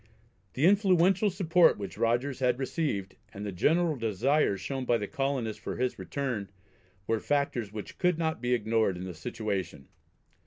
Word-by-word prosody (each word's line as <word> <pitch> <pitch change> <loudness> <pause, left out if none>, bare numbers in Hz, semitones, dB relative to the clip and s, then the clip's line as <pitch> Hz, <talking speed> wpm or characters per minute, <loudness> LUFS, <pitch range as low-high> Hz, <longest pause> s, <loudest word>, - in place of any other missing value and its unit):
The 140 - +1
influential 190 0 +4
support 180 -2 +4
which 100 -5 -6
Rogers 120 +4 0
had 125 -2 +2
received, 130 - -2
and 105 -1 -7
the 100 - -3
general 160 - +2
desire 115 +1 +1
shown 135 +5 -4
by 120 -1 +2
the 105 - -3
colonists 130 -3 -2
for - - -4
his 125 0 -2
return, 125 -8 -3 0.6
were 115 +1 0
factors 135 -6 -1
which 105 -1 -8
could 180 -2 +2
not 160 -5 -1
be 125 0 +2
ignored 110 -4 +1
in 90 - -6
the 95 -1 -6
situation. 95 - -4
125 Hz, 160 wpm, -29 LUFS, 105-155 Hz, 0.6 s, influential